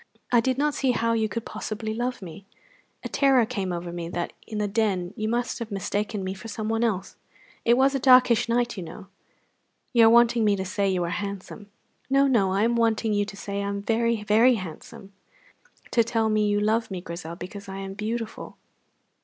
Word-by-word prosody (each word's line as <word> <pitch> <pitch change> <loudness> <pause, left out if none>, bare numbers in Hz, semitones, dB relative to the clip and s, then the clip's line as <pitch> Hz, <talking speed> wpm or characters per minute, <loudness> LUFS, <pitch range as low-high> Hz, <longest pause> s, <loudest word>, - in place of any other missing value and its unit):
I 240 - +5
did 255 +2 0
not 295 +1 +1
see 265 -3 +1
how 230 0 +1
you 220 -1 0
could 230 +1 -4
possibly 215 0 -4
love 240 -1 -3
me. 190 +3 -10 0.6
A - - -3
terror 270 -4 +3
came 200 -6 -3
over 175 0 -4
me 170 -1 -5
that 175 0 -4
in 215 - -5
the 210 0 0
Den 195 -4 -1
you 215 0 -2
must 240 +2 -1
have 230 -2 -5
mistaken 205 0 -2
me 185 0 -3
for 195 +4 -10
someone 225 +1 -2
else. 195 -4 -2 0.5
It 235 +1 +5
was 270 +1 +4
a 275 - 0
darkish 250 -3 +5
night, 240 -1 0
you - - -4
know." 180 +4 -10 0.8
"You 230 -2 +7
are - - +7
wanting 235 0 +5
me 205 -1 +3
to 190 -1 -4
say 200 +1 0
you 185 -2 0
are 170 - -2
handsome." 200 +2 -6 0.4
"No, 275 +1 +4
no; 225 -8 +2
I 195 +2 +1
am 235 +1 +2
wanting 225 -1 +1
you 205 0 +1
to 200 -1 -10
say 200 0 -4
I 200 - -3
am 200 0 -3
very, 230 0 0
very 225 +5 +5
handsome. 190 +1 -9 0.8
Tell 225 -1 +2
me 215 -1 +2
you 205 0 +1
love 220 +2 +1
me, 190 -2 -4
Grizel, 170 -1 -7
because 195 +3 -9
I 195 - -6
am 195 0 -6
beautiful." 220 +2 -5
215 Hz, 205 wpm, -25 LUFS, 195-235 Hz, 0.8 s, You